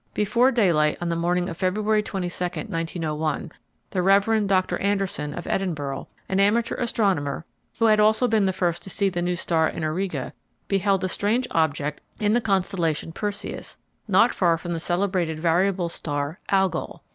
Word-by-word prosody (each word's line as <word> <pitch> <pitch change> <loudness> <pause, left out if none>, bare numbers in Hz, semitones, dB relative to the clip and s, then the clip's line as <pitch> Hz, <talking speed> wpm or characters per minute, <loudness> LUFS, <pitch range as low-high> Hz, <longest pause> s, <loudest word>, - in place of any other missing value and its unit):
Before 235 +5 +3
daylight 170 - +2
on 175 - -2
the 170 - 0
morning 175 +1 0
of 170 -3 -6
February 210 +4 +1
22, 180 -3 -4
1901, 165 -4 -3 0.4
the 185 - 0
Rev. 200 +3 +3
Doctor 185 -1 +1
Anderson, 195 -7 -1
of 175 - -6
Edinburgh, 145 -8 -2 0.2
an 190 - 0
amateur 220 +4 +3
astronomer, 190 - 0 0.3
who 230 - +2
had 215 -1 +5
also 220 +4 +4
been 220 -4 +2
the 190 - +2
first 175 -2 -1
to - - -9
see 200 +1 +1
the 175 -2 -3
new 175 0 0
star 160 -2 +1
in 160 - -5
Auriga, 155 -4 -2 0.3
beheld 195 -1 +1
a - - +1
strange 215 +7 0
object 150 -2 0 0.2
in 210 0 +2
the 240 - +3
constellation 185 -6 0
Perseus 205 +3 -5 0.3
not 215 +4 +4
far 170 -3 +2
from 175 +1 -6
the 165 - -1
celebrated 175 -2 -1
variable 175 +2 +2
star 145 -1 -3
Algol. 190 -1 0
185 Hz, 165 wpm, -24 LUFS, 165-200 Hz, 0.4 s, had